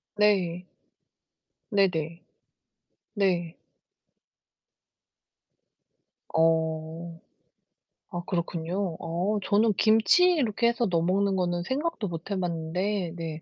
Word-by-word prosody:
네. 180 Hz, -4 st, +2 dB, 1.0 s
네네. 175 Hz, -6 st, 0 dB, 0.9 s
네. 175 Hz, -5 st, 0 dB, 2.8 s
어. 160 Hz, +1 st, 0 dB, 0.9 s
아, 175 Hz, -, -2 dB
그렇군요. 170 Hz, 0 st, -2 dB
어, 180 Hz, +6 st, -1 dB
저는 215 Hz, +1 st, +3 dB
김치 220 Hz, -, +5 dB
이렇게 235 Hz, -7 st, +1 dB
해서 235 Hz, 0 st, +1 dB
넣어 170 Hz, -3 st, +1 dB
먹는 195 Hz, +3 st, +1 dB
거는 175 Hz, -1 st, 0 dB
생각도 265 Hz, -, -2 dB
못 165 Hz, +3 st, -7 dB
해 195 Hz, -, -1 dB
봤는데 175 Hz, +2 st, -2 dB
네 160 Hz, -2 st, -5 dB
180 Hz, 155 characters per minute, -27 LUFS, 165-205 Hz, 2.8 s, 김치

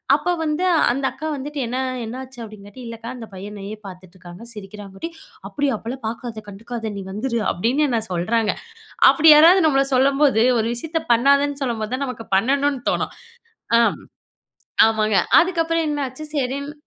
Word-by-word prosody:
அப்ப -, -, -2 dB
வந்து 305 Hz, +3 st, -1 dB, 0.3 s
அந்த 270 Hz, +2 st, -2 dB
அக்கா 310 Hz, +3 st, -6 dB
வந்துட்டு 290 Hz, +2 st, -6 dB
என்ன, 250 Hz, -, -3 dB, 0.3 s
என்னாச்சு? 255 Hz, +2 st, -8 dB
அப்டிங்காட்டி 210 Hz, +2 st, -12 dB
இல்ல 230 Hz, 0 st, -7 dB
அக்கா, 230 Hz, -, -7 dB
அந்த 230 Hz, -3 st, -9 dB
பைய 195 Hz, +2 st, -8 dB
எனையே 205 Hz, 0 st, -7 dB
பாத்துட்டுருக்காங்க, 185 Hz, +1 st, -12 dB
சிரிக்கிறாங்கட்டி. 205 Hz, -, -8 dB, 0.4 s
அப்டியா! 285 Hz, -3 st, -1 dB
அப்பலாம் 245 Hz, +4 st, -7 dB
பாக்காத, 225 Hz, -1 st, -6 dB
கண்டுக்காத 225 Hz, +2 st, -6 dB
நீ -, -, -5 dB
வந்துரு 235 Hz, +4 st, -2 dB
அப்டின்னு 245 Hz, -, +1 dB
என்ன 235 Hz, -3 st, 0 dB
சொல்றாங்க. 215 Hz, +5 st, 0 dB, 0.6 s
அப்டி 320 Hz, 0 st, +5 dB
யாராது 335 Hz, +5 st, +7 dB
நம்மள 275 Hz, -2 st, +3 dB
சொல்லம்போது 275 Hz, -2 st, +3 dB, 0.2 s
ஒரு 220 Hz, -, 0 dB
விஷயத்த 325 Hz, +6 st, -3 dB
பண்ணாதன்னு 280 Hz, +3 st, +2 dB
சொல்லம்போது 230 Hz, -2 st, -2 dB
தான், 275 Hz, +2 st, -2 dB
நமக்கு 230 Hz, -3 st, -7 dB
பண்ணணும்னு 275 Hz, +4 st, +1 dB
தோணும். -, -, -2 dB, 0.6 s
ஆ -, -, +6 dB, 1.1 s
ஆமாங்க. 215 Hz, -2 st, +1 dB, 0.2 s
அதுக்கப்புறம் 330 Hz, -2 st, 0 dB
என்னாச்சு 290 Hz, 0 st, -4 dB
சரின்னு 280 Hz, +2 st, -2 dB
245 Hz, 145 wpm, -21 LUFS, 215-280 Hz, 1.1 s, யாராது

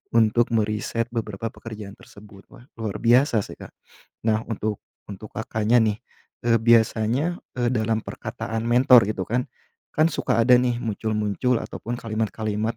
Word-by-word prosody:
untuk 115 Hz, +1 st, +4 dB
meriset 110 Hz, +1 st, -1 dB
beberapa 110 Hz, -1 st, -4 dB
pekerjaan 105 Hz, -3 st, -9 dB
tersebut, 100 Hz, -1 st, -16 dB
wah 120 Hz, -, -16 dB
luar 110 Hz, -3 st, -3 dB
biasa 120 Hz, -2 st, +3 dB
sih -, -, -9 dB
Kak. -, -, -10 dB, 0.6 s
Nah 110 Hz, +1 st, +1 dB
untuk 110 Hz, -1 st, -3 dB, 0.3 s
untuk 105 Hz, +1 st, -9 dB
Kakaknya 110 Hz, +2 st, +1 dB
nih, 110 Hz, -2 st, +1 dB, 0.5 s
eee, 115 Hz, -1 st, +4 dB
biasanya, 115 Hz, +7 st, +2 dB, 0.2 s
eee, 120 Hz, -1 st, +1 dB
dalam 110 Hz, -2 st, 0 dB
perkataan 115 Hz, 0 st, -5 dB
mentor 120 Hz, -2 st, +6 dB
gitu 95 Hz, -3 st, -2 dB
kan, 125 Hz, +5 st, -2 dB, 0.5 s
kan 155 Hz, -, +4 dB
suka -, -, 0 dB
ada 125 Hz, +1 st, +6 dB
nih 125 Hz, -1 st, +1 dB
muncul-muncul 110 Hz, +2 st, -1 dB
ataupun 120 Hz, +2 st, -5 dB
kalimat-kalimat 110 Hz, -1 st, -2 dB
110 Hz, 140 wpm, -24 LUFS, 110-120 Hz, 0.6 s, mentor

